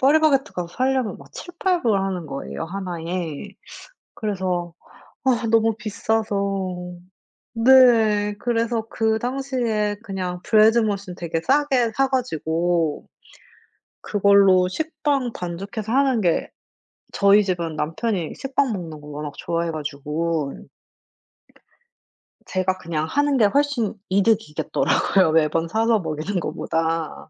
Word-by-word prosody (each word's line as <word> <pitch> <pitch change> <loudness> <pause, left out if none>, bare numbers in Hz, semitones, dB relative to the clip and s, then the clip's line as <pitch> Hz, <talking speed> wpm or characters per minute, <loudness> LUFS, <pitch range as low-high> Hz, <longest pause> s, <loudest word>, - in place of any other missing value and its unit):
파리바게뜨 295 0 +3
가서 175 -1 -4
살려면 255 +1 -1
막 - - -15
$7-8 355 -1 -2
불 215 -5 +2
하는 185 -4 -3
거예요 140 +3 -5
하나에. 175 -1 -5 0.7
그래서 185 -5 -2 0.5
아 240 -3 +2
너무 225 -1 +3
비싸서 200 -4 -2 0.6
네 225 -4 +5
그래서 230 -1 -1
그 220 0 +1
당시에 245 -5 -1
그냥 185 -4 -4
Bread 220 +1 +5
Machine 200 -4 -2
되게 165 -1 -3
싸게 265 - +2
사 270 0 +3
가지고 170 - -1 0.9
그걸로 200 -2 +4
식빵 290 - -1
반죽해서 195 +5 -5
하는 265 -4 +3
게 175 -3 +1 0.6
저희 200 +1 +5
집은 170 -4 -2
남편이 170 +2 -2
식빵 270 -2 0
먹는 165 -6 -6
거 150 - -13
워낙 150 0 -6
좋아해 170 0 -2
가지고. 150 0 -3 1.9
제가 185 0 -1
그냥 160 -3 -3
하는 285 - +1
게 220 - +5
훨씬 275 -2 +1 0.2
이득이겠더라고요. 190 -3 +2
매번 165 +1 +2
사서 220 +4 +2
먹이는 160 +3 -3
거보다. 165 0 -3
200 Hz, 260 characters per minute, -22 LUFS, 170-235 Hz, 1.9 s, 네